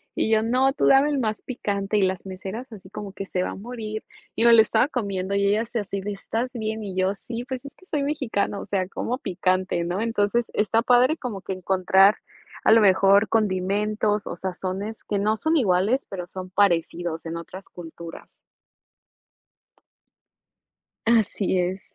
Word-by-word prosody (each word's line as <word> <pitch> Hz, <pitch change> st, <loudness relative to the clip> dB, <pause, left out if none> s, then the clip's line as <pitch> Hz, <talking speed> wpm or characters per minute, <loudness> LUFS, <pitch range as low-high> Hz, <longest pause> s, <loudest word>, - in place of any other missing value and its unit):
Y 220 Hz, -, 0 dB
yo: 220 Hz, -1 st, +4 dB
"No, 255 Hz, +4 st, +2 dB
tú -, -, +1 dB
dame 275 Hz, +2 st, +6 dB
el 280 Hz, -, 0 dB
más 220 Hz, -3 st, -2 dB
picante". 205 Hz, -4 st, -2 dB
Y -, -, +3 dB
las 190 Hz, -1 st, 0 dB
meseras 195 Hz, +6 st, -7 dB
así 190 Hz, -4 st, -12 dB
como 200 Hz, -1 st, -7 dB
que: 195 Hz, -, -6 dB
"Se 180 Hz, -1 st, -1 dB
va -, -, -3 dB
a -, -, -7 dB
morir". 215 Hz, 0 st, -6 dB, 0.3 s
Y -, -, 0 dB
me 235 Hz, 0 st, +7 dB
lo 225 Hz, -, +9 dB
estaba 250 Hz, -, +2 dB
comiendo 200 Hz, -7 st, -2 dB
y 200 Hz, 0 st, +2 dB
ellas 220 Hz, +4 st, 0 dB
así 200 Hz, -3 st, -2 dB
de: 205 Hz, +1 st, -4 dB
"¿Estás 230 Hz, +5 st, -3 dB
bien?". 220 Hz, -2 st, -3 dB
Y 195 Hz, -3 st, -6 dB
yo: 185 Hz, +1 st, +1 dB
"Sí, 235 Hz, +4 st, -7 dB
pues 260 Hz, 0 st, -5 dB
es 280 Hz, -, -10 dB
que 370 Hz, -, -21 dB
soy 300 Hz, -6 st, -2 dB
mexicano, 270 Hz, -9 st, -1 dB
o -, -, -7 dB
sea, 190 Hz, -2 st, -1 dB
como 250 Hz, +5 st, -3 dB
picante, 185 Hz, -3 st, 0 dB
¿no?". 175 Hz, +4 st, -2 dB
Entonces 225 Hz, +1 st, +1 dB
está 220 Hz, +2 st, +2 dB
padre 250 Hz, +5 st, +4 dB
como 235 Hz, -10 st, -5 dB
que 190 Hz, -, -4 dB
encontrar 190 Hz, +2 st, +4 dB, 0.5 s
a -, -, +5 dB
lo 225 Hz, 0 st, +7 dB
mejor 200 Hz, +1 st, +5 dB
condimentos 210 Hz, +1 st, 0 dB
o -, -, -5 dB
sazones 190 Hz, +4 st, -5 dB
que 205 Hz, -, -2 dB
no 215 Hz, +2 st, +1 dB
son 315 Hz, +6 st, +1 dB
iguales, 215 Hz, -, +2 dB
pero 180 Hz, -3 st, -5 dB
son 185 Hz, +1 st, -8 dB
parecidos 175 Hz, -3 st, 0 dB
en 165 Hz, +1 st, -4 dB
otras 185 Hz, +3 st, -10 dB
culturas. 170 Hz, -1 st, -11 dB, 2.7 s
Así 215 Hz, -4 st, +2 dB
es. 185 Hz, +2 st, -1 dB
205 Hz, 180 wpm, -24 LUFS, 190-230 Hz, 2.7 s, lo